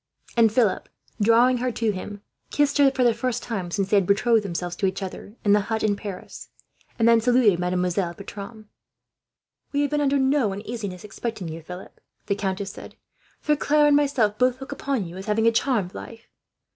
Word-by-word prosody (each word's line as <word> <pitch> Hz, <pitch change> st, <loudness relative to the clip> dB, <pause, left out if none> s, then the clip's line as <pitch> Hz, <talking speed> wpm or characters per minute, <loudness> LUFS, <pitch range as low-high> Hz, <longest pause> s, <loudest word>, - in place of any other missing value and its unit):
And 230 Hz, -2 st, +5 dB
Philip, 220 Hz, -5 st, +1 dB, 0.3 s
drawing 235 Hz, +4 st, +5 dB
her 250 Hz, +1 st, -1 dB
to 225 Hz, -2 st, 0 dB
him, 205 Hz, +1 st, -7 dB, 0.3 s
kissed 290 Hz, 0 st, +1 dB
her 280 Hz, -1 st, +7 dB
for 265 Hz, -1 st, 0 dB
the 240 Hz, -1 st, +4 dB
first 245 Hz, +1 st, -2 dB
time 195 Hz, -7 st, -4 dB
since 195 Hz, +2 st, -1 dB
they 210 Hz, -, +5 dB
had 190 Hz, -3 st, +2 dB
betrothed 225 Hz, +3 st, +3 dB
themselves 175 Hz, -2 st, -4 dB
to 195 Hz, -, +1 dB
each 190 Hz, +1 st, -3 dB
other 195 Hz, +2 st, -8 dB
in 205 Hz, -, +5 dB
the 210 Hz, -, +5 dB
hut 220 Hz, -1 st, -1 dB
in 210 Hz, -2 st, +2 dB
Paris; 200 Hz, -2 st, -8 dB, 0.5 s
and 230 Hz, -, +3 dB
then 230 Hz, -1 st, +5 dB
saluted 240 Hz, -6 st, +4 dB
Mademoiselle 180 Hz, 0 st, -1 dB
Bertram. 205 Hz, +3 st, -9 dB, 1.0 s
"We 285 Hz, -, +1 dB
have 285 Hz, -, 0 dB
been 295 Hz, 0 st, +1 dB
under 280 Hz, 0 st, +2 dB
no 265 Hz, -6 st, +2 dB
uneasiness 205 Hz, -3 st, -6 dB
respecting 210 Hz, -3 st, -5 dB
you, 160 Hz, +1 st, -7 dB
Philip," 180 Hz, +3 st, -11 dB, 0.2 s
the -, -, 0 dB
countess 195 Hz, -1 st, -3 dB
said; -, -, -11 dB, 0.5 s
"for 300 Hz, -, +2 dB
Claire 295 Hz, +1 st, +3 dB
and 295 Hz, -1 st, +5 dB
myself 265 Hz, -8 st, +1 dB
both 255 Hz, 0 st, +2 dB
look 270 Hz, 0 st, -8 dB
upon 275 Hz, -6 st, -2 dB
you 170 Hz, +2 st, -9 dB
as 190 Hz, -, -8 dB
having 220 Hz, +1 st, +1 dB
a 230 Hz, -, +6 dB
charmed 225 Hz, -6 st, 0 dB
life. 230 Hz, 0 st, -10 dB
220 Hz, 195 wpm, -24 LUFS, 195-250 Hz, 1.0 s, her